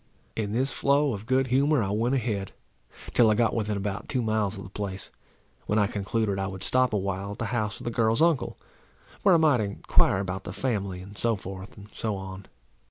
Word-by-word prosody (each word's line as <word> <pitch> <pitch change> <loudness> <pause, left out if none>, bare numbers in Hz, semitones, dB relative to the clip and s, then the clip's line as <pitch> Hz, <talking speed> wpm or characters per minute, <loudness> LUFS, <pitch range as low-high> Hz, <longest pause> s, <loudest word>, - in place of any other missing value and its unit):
In 105 -2 -2
this 130 +5 0
flow 140 -1 +2
of 105 +1 -7
good 130 0 +3
humour 140 -1 +4
I 100 - -2
went 115 +5 +1
ahead, 105 -6 -2 0.6
till 115 -2 +6
I 105 - +4
got 115 +1 +2
within 105 -2 -1
about 100 0 -4
two 125 -3 0
miles 110 -2 0
of 100 - -7
the 95 - -9
place, 100 -2 -5 0.6
when 105 - +1
I 105 - +4
concluded 100 0 -1
I 95 - -1
would 95 0 -5
stop 130 +4 +3
awhile 100 -1 -2
at - - -11
the 115 - -2
house 105 -3 -1
of - - -9
the 120 - -2
girl's 115 -1 +2
uncle; 165 -3 +2 0.6
where 190 -3 +6
I - - +7
might 155 -6 +4
enquire 100 -2 +2
about 95 0 -3
the - - -6
family, 100 -8 -2
and 100 +2 -11
so 115 +2 +1
forth, 95 +1 -8
and 100 0 -11
so 110 -3 -2
on. 95 0 -7
105 Hz, 215 wpm, -27 LUFS, 100-120 Hz, 0.6 s, I